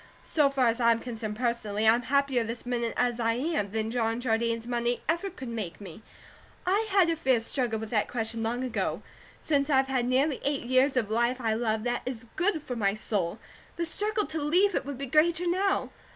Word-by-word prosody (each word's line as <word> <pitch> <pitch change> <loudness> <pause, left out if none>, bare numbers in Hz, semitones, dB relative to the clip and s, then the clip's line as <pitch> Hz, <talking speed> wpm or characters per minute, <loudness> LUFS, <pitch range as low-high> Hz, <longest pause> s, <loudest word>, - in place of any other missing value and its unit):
So 295 -3 +2
far 270 -2 +1
as 230 +1 +2
I'm 230 -1 +4
concerned 225 -3 -5
personally, 220 -3 -1
I'm 230 +2 +5
happier 275 -1 +1
this 230 +2 -5
minute 240 -2 -2
as 245 -1 +1
I 230 -1 +2
am, 255 -4 -1
than 220 +2 -2
John 230 -1 0
Jardine's 230 -1 0
money 240 0 -1
ever 340 +5 0
could 300 -8 -9
make 215 -8 -5
me. 195 -1 -10 0.6
I 405 +5 +1
had 380 -4 +4
a - - 0
fierce 260 -7 +1
struggle 245 -4 0
with 220 0 -6
that 215 -3 +1
question 225 -1 -2
long 235 +3 -1
ago; 255 -2 -2 0.4
since 285 -1 +1
I 275 - +4
have 265 0 +2
had 250 -2 0
nearly 265 +3 +1
eight 280 -1 -1
years 260 +2 +2
of 220 -4 0
life 235 +3 +1
I 225 -3 0
love, 220 -1 -1
that 240 0 -1
is 250 -2 -5
good 355 -4 +1
for 250 - -5
my 200 -3 +1
soul, 205 -4 -1 0.4
the 340 - -2
struggle 420 +5 0
to 310 +1 -3
leave 360 +7 +3
it - - -2
would 285 -2 -5
be 275 - -4
greater 320 +5 +2
now. 385 +3 +1
245 Hz, 210 wpm, -28 LUFS, 225-285 Hz, 0.6 s, I'm